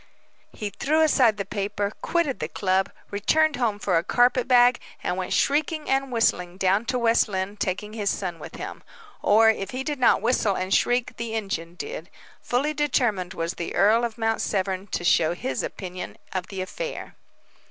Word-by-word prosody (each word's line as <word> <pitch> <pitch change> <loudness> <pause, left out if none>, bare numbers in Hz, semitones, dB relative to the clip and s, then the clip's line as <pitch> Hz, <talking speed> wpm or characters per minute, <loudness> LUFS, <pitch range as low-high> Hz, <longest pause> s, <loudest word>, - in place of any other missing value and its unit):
He 210 -2 -5
threw 310 +8 +1
aside 255 -8 +4
the 200 - -3
paper, 205 0 -2
quitted 300 - 0
the 155 - -2
club, 190 +3 0 0.2
returned 295 +9 +2
home 230 -5 0
for 190 -4 +1
a - - -4
carpet 245 +4 +2
bag, 245 -1 +5 0.2
and 180 - -1
went 185 -1 -4
shrieking 305 +2 +1
and 270 0 0
whistling 180 -6 +1
down 195 +4 +2
to 255 +1 -1
West 235 -1 +3
Lynne, 190 0 -3
taking 210 +2 -3
his 210 -3 -1
son 175 -4 -3
with - - -9
him. - - -7 0.4
Or, 220 +2 +5
if 195 -3 -5
he 255 +3 -4
did 295 -1 -3
not 250 - +5
whistle 225 -4 +2
and 185 +1 -2
shriek 245 0 +1
the 230 -1 -4
engine 175 -6 -4
did. 465 - -7 0.3
Fully 275 +5 0
determined 240 -11 0
was 165 +1 -2
the 170 - -5
earl 215 +5 +4
of 235 -1 -3
Mount 225 -1 0
Severn 190 -1 -1
to 180 - -3
show 170 -1 +3
his 135 -6 -3
opinion 185 -1 -6 0.2
of 185 -1 -3
the 195 -2 -5
affair. - - -6
210 Hz, 185 wpm, -25 LUFS, 190-250 Hz, 0.4 s, bag